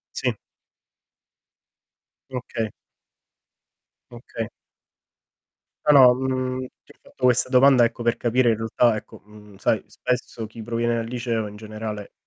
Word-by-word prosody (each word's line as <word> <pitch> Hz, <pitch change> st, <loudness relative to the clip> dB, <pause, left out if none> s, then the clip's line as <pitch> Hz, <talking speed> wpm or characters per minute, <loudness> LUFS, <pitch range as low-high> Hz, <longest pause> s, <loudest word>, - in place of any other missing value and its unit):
Sì. -, -, 0 dB, 2.0 s
Okay. 115 Hz, -4 st, -4 dB, 1.4 s
Okay. 115 Hz, -1 st, -6 dB, 1.4 s
No 150 Hz, -, +6 dB
no, 130 Hz, -3 st, +8 dB
mhmm, 130 Hz, 0 st, -2 dB, 0.3 s
ti -, -, -18 dB
ho -, -, -34 dB
fatto -, -, -9 dB
questa 125 Hz, 0 st, +4 dB
domanda, 130 Hz, -1 st, +6 dB
ecco, 115 Hz, +1 st, -2 dB
per 120 Hz, 0 st, +2 dB
capire, 120 Hz, +1 st, +2 dB
in 110 Hz, -, +1 dB
realtà, 115 Hz, +1 st, +2 dB
ecco, 105 Hz, -, -10 dB
mhmm, 105 Hz, -1 st, -16 dB
sai -, -, +1 dB
spesso 120 Hz, -2 st, -3 dB
chi 110 Hz, +1 st, -10 dB
proviene 120 Hz, +1 st, -1 dB
dal 115 Hz, -1 st, -2 dB
liceo, 115 Hz, -3 st, -2 dB
in 105 Hz, -, -11 dB
generale 110 Hz, -1 st, -7 dB
115 Hz, 125 wpm, -23 LUFS, 110-125 Hz, 2.0 s, no